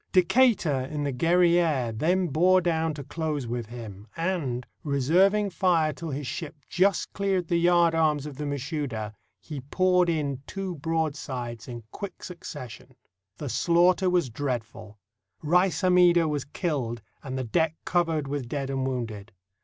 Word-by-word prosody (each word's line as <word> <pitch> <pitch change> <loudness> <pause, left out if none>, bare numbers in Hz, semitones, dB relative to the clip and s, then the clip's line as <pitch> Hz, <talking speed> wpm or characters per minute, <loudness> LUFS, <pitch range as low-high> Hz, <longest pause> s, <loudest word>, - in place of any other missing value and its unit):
Decatur 180 - +3
in 150 -1 -3
the 140 - -1
Guerriere 170 -3 +3
then 175 +10 +1
bore 180 +6 +4
down 165 -3 0
to 145 - -6
close 150 -1 -3
with 120 -1 -4
him, 110 -3 -9
and, 160 -9 -1 0.2
reserving 185 +9 +3
fire 170 -4 +2
till 165 +3 -6
his 145 0 -4
ship 155 +4 -5
just 190 0 +1
cleared 195 -3 0
the 170 - +2
yardarms 165 -4 +3
of 150 -2 -7
the 150 0 -3
Mashouda, 140 -6 -3 0.3
he 150 -4 -7
poured 180 +5 +2
in 145 -5 -1
two 195 -2 -4
broadsides 140 -7 -3
in 120 -2 -7
quick 200 -3 -7
succession. 130 -8 -9 0.4
The 145 - -5
slaughter 175 +6 +3
was 175 -8 +1
dreadful. 110 -5 -4 0.5
Rais 175 +1 +2
Hammida 180 -2 +5
was 145 -3 -2
killed 135 - -3 0.2
and 130 -1 -5
the 130 - -1
deck 160 +6 +1
covered 165 -5 +1
with 135 -3 -4
dead 135 -1 -3
and 135 -1 -1
wounded. 115 -5 -4
155 Hz, 145 wpm, -27 LUFS, 130-175 Hz, 0.5 s, Hammida